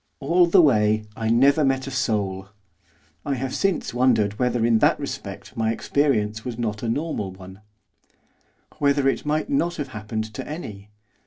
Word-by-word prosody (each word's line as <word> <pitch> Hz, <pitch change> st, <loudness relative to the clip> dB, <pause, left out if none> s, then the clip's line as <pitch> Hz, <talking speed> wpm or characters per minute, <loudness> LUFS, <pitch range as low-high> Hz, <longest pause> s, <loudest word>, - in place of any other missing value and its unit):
All 170 Hz, +5 st, +3 dB
the 175 Hz, +1 st, +6 dB
way 110 Hz, -5 st, +3 dB
I 110 Hz, -1 st, -2 dB
never 140 Hz, +6 st, +4 dB
met 135 Hz, -1 st, +1 dB
a 135 Hz, -, -6 dB
soul. 100 Hz, -7 st, -1 dB, 0.7 s
I 140 Hz, -, -1 dB
have 130 Hz, 0 st, -4 dB
since 195 Hz, -10 st, -1 dB
wondered 115 Hz, -5 st, +2 dB
whether 125 Hz, -2 st, +1 dB
in 115 Hz, -1 st, +3 dB
that -, -, +3 dB
respect -, -, -7 dB
my 110 Hz, 0 st, 0 dB
experience 110 Hz, -4 st, 0 dB
was 120 Hz, -3 st, -5 dB
not 105 Hz, -3 st, -3 dB
a 115 Hz, -, -2 dB
normal 130 Hz, -, -2 dB
one; 95 Hz, +1 st, -12 dB, 1.2 s
whether 140 Hz, -2 st, +2 dB
it 135 Hz, -, -1 dB
might 155 Hz, -, -1 dB
not 175 Hz, -12 st, +1 dB
have 145 Hz, -3 st, -5 dB
happened 110 Hz, -1 st, -5 dB
to -, -, -6 dB
any. 105 Hz, -, -7 dB
120 Hz, 165 wpm, -23 LUFS, 105-140 Hz, 1.2 s, the